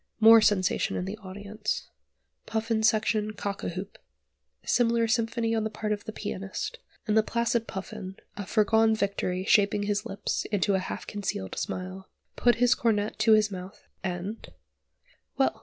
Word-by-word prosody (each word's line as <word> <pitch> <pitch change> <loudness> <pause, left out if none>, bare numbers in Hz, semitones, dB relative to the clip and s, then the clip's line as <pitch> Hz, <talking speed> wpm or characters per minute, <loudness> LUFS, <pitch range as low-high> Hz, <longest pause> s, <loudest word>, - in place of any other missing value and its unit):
More 225 0 +9
sensation 205 -3 +2
in 180 - -2
the 205 +3 -5
audience. 205 +2 -5 0.6
Puffin 220 0 0
section 215 -1 +2
cock 200 -1 -4
a - - -1
hoop. 185 +3 -7 0.7
Similar 230 -1 +3
symphony 230 0 0
on 220 -1 +1
the 220 - -1
part 215 0 -4
of 205 - -6
the - - -4
pianist, 200 - -5 0.3
and 215 -2 +1
the 220 - +6
placid 235 +1 0
Puffin, 190 0 -6 0.2
a 200 -2 -6
foregone 220 +1 +4
victory 195 -3 -1
shaping 205 -1 +4
his 205 0 0
lips 195 - -3
into 205 -1 +1
a 190 - +3
half 185 - -5
concealed 195 - -4
smile, 185 +1 -5 0.3
put 240 0 +4
his 245 +1 +4
cornet 215 -4 0
to 220 0 +5
his 215 -1 +4
mouth, 185 +2 -8 0.2
and 190 +4 -4 0.9
Well! - - +2
210 Hz, 155 wpm, -28 LUFS, 195-225 Hz, 0.9 s, More